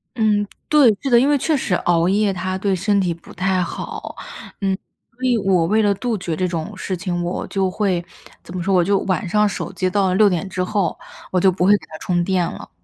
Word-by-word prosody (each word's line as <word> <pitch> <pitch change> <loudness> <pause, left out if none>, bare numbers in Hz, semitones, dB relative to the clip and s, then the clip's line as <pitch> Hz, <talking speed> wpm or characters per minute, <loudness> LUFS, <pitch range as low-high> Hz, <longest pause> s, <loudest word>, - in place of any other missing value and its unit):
嗯， 210 -3 +2 0.2
对， 295 -5 +6
是 275 - -2
的， 240 -2 +6
因 270 +4 +3
为 295 - +4
确 310 +3 +1
实 265 -8 -1
熬 170 -1 +2
夜 200 0 +2
它 185 +1 -3
对 195 0 0
身 200 +3 +1
体 180 -3 0
不 165 - -15
太 185 0 0
好。 175 - -5 0.5
嗯， 195 -1 0 0.3
所 250 +2 -14
以 250 -2 +3
我 190 -5 +2
为 215 +6 +2
了 205 -1 +3
杜 225 +3 -2
绝 170 -4 -3
这 185 +3 0
种 170 +3 -4
事 190 0 -3
情， 175 -1 -2
我 175 +1 -3
就 195 -1 0
会 185 -3 0 0.4
怎 175 - -10
么 180 - -2
说 195 +3 0
我 180 -2 +4
就 195 +2 +2
晚 185 -2 -1
上 210 +4 +3
手 200 - -4
机 185 -1 -1
到 195 +1 +1
了 185 - +1
6 210 +2 +6
点 190 0 0
之 180 0 -2
后， 185 -3 -1 0.3
我 185 - +2
就 190 +1 +4
不 180 0 0
会 200 - +5
给 - - -15
它 155 - -8
充 175 -1 0
电 185 0 +1
了。 - - -10
190 Hz, 255 characters per minute, -20 LUFS, 180-210 Hz, 0.5 s, 对